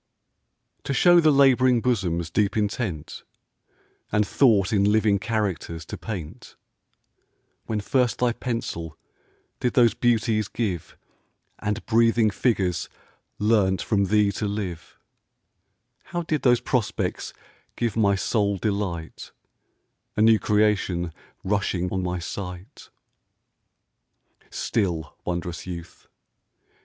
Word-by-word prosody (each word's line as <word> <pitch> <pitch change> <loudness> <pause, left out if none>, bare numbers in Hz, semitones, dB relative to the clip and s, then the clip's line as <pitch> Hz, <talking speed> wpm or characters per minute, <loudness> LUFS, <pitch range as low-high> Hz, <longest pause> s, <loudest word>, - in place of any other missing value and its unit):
TO 140 - -2
show 175 +6 +6
the 160 -2 +4
lab'ring 130 -3 +5
bosom's 90 -9 -1
deep 105 +1 +1
intent, 105 -6 -3 0.9
And 105 0 +2
thought 110 -7 +3
in 100 -2 +3
living 105 -2 +3
characters 95 -7 -3
to - - -7
paint, 95 -9 -7 1.1
When 110 -2 -1
first 125 +3 +1
thy 125 -1 +1
pencil 100 - -4 0.6
did 125 - 0
those 120 -5 +5
beauties 115 -3 +1
give, 100 -9 -4 0.6
And 105 +1 -3
breathing 115 -1 +3
figures 95 -6 0 0.5
learnt 105 -3 +2
from 100 -3 +1
thee 105 +1 +3
to 105 +1 -3
live, 95 -6 -5 1.1
How 175 0 -3
did 155 -2 -1
those 120 -2 +4
prospects 120 -5 -2 0.4
give 115 -4 -1
my 100 -3 +3
soul 100 0 0
delight, 95 -5 -3 0.9
A - - +2
new 110 -1 +6
creation 95 -5 +1 0.3
rushing 95 -2 -1
on 95 - 0
my 90 0 -2
sight? 90 - -7 1.6
Still, 85 -8 -2
wond'rous 85 -1 -4
youth! 85 -2 -9
105 Hz, 105 wpm, -24 LUFS, 90-115 Hz, 1.6 s, show